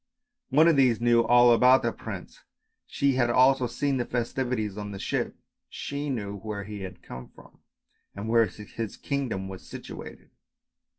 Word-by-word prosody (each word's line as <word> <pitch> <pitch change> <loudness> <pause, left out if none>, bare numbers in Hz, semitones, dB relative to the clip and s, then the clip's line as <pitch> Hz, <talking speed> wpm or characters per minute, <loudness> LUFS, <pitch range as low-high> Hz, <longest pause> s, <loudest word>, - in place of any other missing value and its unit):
One 155 +5 +5
of 165 -4 +4
these 125 -4 +4
knew 120 0 +4
all 120 +1 +6
about 125 +3 +5
the 120 - +1
prince, - - -8 0.5
she 140 -1 +1
had 120 -2 +2
also 130 +1 +4
seen 140 +3 -1
the 125 - 0
festivities 120 -3 -2
on 105 -1 -6
the 100 - -7
ship; - - -2 0.3
she 145 +1 -5
knew 100 -6 -3
where 100 0 -5
he 105 0 -7 0.3
came 60 0 -8
from - - -19 0.6
and 100 +2 -5
where 115 0 +4
his 105 +1 -7
kingdom 125 -9 -3
was 95 -1 -8
situated. - - -10
120 Hz, 160 wpm, -27 LUFS, 105-130 Hz, 0.6 s, all